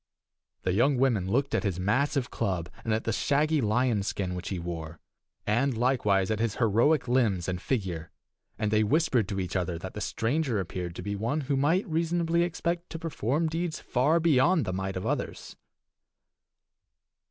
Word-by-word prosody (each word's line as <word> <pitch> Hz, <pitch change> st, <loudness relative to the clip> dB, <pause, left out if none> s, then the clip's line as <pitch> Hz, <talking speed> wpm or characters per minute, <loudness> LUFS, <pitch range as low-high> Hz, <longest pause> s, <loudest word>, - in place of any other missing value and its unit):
The 90 Hz, -, +1 dB
young 125 Hz, +7 st, +3 dB
women 120 Hz, -8 st, +2 dB
looked 135 Hz, +6 st, +1 dB
at -, -, +2 dB
his 95 Hz, -4 st, -1 dB
massive 130 Hz, +7 st, +1 dB
club, 90 Hz, -6 st, -2 dB
and 115 Hz, -, -2 dB
at 110 Hz, +1 st, +1 dB
the 115 Hz, -, -1 dB
shaggy 150 Hz, +5 st, +2 dB
lion's 110 Hz, -2 st, +1 dB
skin 95 Hz, -3 st, -2 dB
which 90 Hz, -1 st, -5 dB
he 95 Hz, -, -2 dB
wore, 85 Hz, -2 st, -6 dB, 0.5 s
and, 120 Hz, +4 st, +1 dB
likewise, 110 Hz, -6 st, +2 dB
at 110 Hz, -, 0 dB
his 115 Hz, -2 st, 0 dB
heroic 120 Hz, +6 st, +3 dB
limbs 115 Hz, -8 st, +2 dB
and 90 Hz, -1 st, -2 dB
figure, 90 Hz, -10 st, -2 dB, 0.5 s
and 105 Hz, -1 st, -1 dB
they 110 Hz, 0 st, +4 dB
whispered 125 Hz, -, +2 dB
to 100 Hz, -1 st, -3 dB
each 90 Hz, -1 st, -3 dB
other 90 Hz, -2 st, -1 dB
that -, -, -7 dB
the -, -, -6 dB
stranger 125 Hz, -1 st, 0 dB
appeared 90 Hz, -1 st, -4 dB
to 90 Hz, -, -6 dB
be 100 Hz, +1 st, -3 dB
one 115 Hz, +10 st, -1 dB
who 140 Hz, 0 st, -1 dB
might 165 Hz, +9 st, +2 dB
reasonably 170 Hz, +1 st, +1 dB
expect 170 Hz, 0 st, -2 dB
to -, -, -5 dB
perform 160 Hz, -, -1 dB
deeds 165 Hz, +1 st, -2 dB
far 145 Hz, +7 st, +2 dB
beyond 165 Hz, 0 st, +3 dB
the 95 Hz, -, -2 dB
might 95 Hz, 0 st, -3 dB
of 90 Hz, -, -4 dB
others. -, -, -3 dB
115 Hz, 175 wpm, -28 LUFS, 95-145 Hz, 0.5 s, they